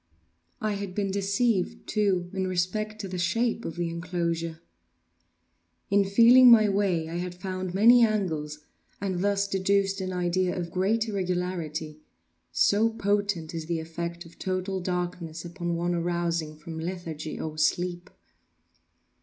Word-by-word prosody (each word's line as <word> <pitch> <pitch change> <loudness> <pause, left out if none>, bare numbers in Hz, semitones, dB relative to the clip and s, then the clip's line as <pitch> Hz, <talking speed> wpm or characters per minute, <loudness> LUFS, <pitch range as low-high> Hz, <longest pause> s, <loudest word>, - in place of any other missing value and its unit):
I 215 - 0
had 200 -2 -4
been 200 -2 -1
deceived, 200 +1 0
too, 190 -4 0
in 190 -1 -1
respect 200 +4 -2
to 195 - -5
the 180 -1 -5
shape 230 +6 0
of 165 - -4
the 175 -1 -1
enclosure. 170 -1 -3 1.3
In 200 0 +5
feeling 235 +5 +7
my 220 -3 +8
way 195 -5 +1
I 165 +1 -4
had 180 0 -4
found 185 0 -4
many 235 +4 +7
angles, 160 -9 -1 0.4
and 190 -2 -2
thus 200 0 +1
deduced 195 0 +1
an 185 0 -3
idea 180 +1 0
of 170 -1 -4
great 215 +5 +1
irregularity; 180 -6 -3 0.5
so 215 +3 +3
potent 205 -6 -1
is 160 -1 -5
the 170 -1 -1
effect 170 +2 -5
of 165 - -16
total 190 0 -2
darkness 175 -2 -3
upon 175 0 -3
one 175 +1 -1
arousing 170 -2 -1
from 160 +1 -8
lethargy 165 -3 -5
or 155 -1 -5
sleep! 175 +2 0
180 Hz, 140 wpm, -27 LUFS, 170-200 Hz, 1.3 s, my